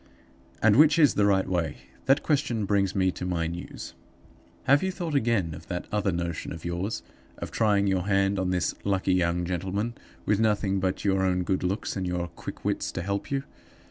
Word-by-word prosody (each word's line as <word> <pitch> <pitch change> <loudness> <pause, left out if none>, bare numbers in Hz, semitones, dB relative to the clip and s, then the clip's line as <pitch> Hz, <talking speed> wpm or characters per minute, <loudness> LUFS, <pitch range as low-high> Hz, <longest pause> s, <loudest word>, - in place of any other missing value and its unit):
"And 110 0 +6
which 150 +1 +6
is 150 -4 +6
the 100 -1 +3
right 95 -2 +2
way? 85 -5 -1 0.3
That 135 +2 +4
question 125 -8 0
brings 100 -1 +1
me 95 -1 +2
to - - -7
my 90 -2 -1
news. 85 +2 -6 0.7
"Have 140 +2 +4
you 190 - 0
thought 175 -4 -4
again 115 - +1
of 80 - -11
that 90 -1 -4
other 105 -2 +1
notion 85 -2 -3
of 85 0 -8
yours 85 +5 -3 0.3
of - - -6
trying 105 -3 +2
your 95 -1 0
hand 95 0 +2
on 95 -1 0
this 90 -1 0
lucky 95 -1 +1
young 90 -1 +1
gentleman, 95 +6 -2 0.3
with 105 0 +2
nothing 105 -3 +1
but 95 +1 -2
your 95 -1 +2
own 90 -1 +1
good 95 +1 0
looks 95 +4 -2
and 95 -2 -2
your 90 0 -1
own 85 - -6
quick - - -8
wits - - -1
to - - -3
help 100 +2 -3
you? 135 -1 -1
95 Hz, 205 wpm, -27 LUFS, 90-105 Hz, 0.7 s, And